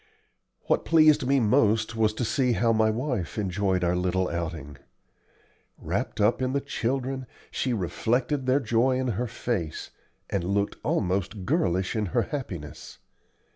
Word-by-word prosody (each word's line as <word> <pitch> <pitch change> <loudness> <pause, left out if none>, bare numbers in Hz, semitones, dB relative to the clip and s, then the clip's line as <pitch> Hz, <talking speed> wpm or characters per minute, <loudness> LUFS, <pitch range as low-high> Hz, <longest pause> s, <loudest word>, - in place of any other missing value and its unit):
What - - 0
pleased 155 -5 +5
me 140 0 +4
most 110 -1 +2
was 110 -1 +2
to 120 - -1
see 125 +1 +1
how 115 0 +2
my 110 0 +3
wife 115 - -2
enjoyed 95 -2 0
our 90 0 +2
little 90 +1 0
outing. 80 -4 -5 1.0
Wrapped - - -3
up 105 +5 +3
in 130 0 0
the 140 - +2
children, 130 -1 -2 0.2
she 130 - -1
reflected 125 - -1
their 130 +2 +4
joy 120 +3 +2
in 130 -1 -1
her 120 +3 -1
face, 100 -9 -3 0.4
and 100 -3 -2
looked 100 +3 -1
almost 95 +1 -1
girlish 95 - 0
in 105 -2 0
her 120 - +4
happiness. 90 - -7
110 Hz, 145 wpm, -26 LUFS, 95-130 Hz, 1.0 s, pleased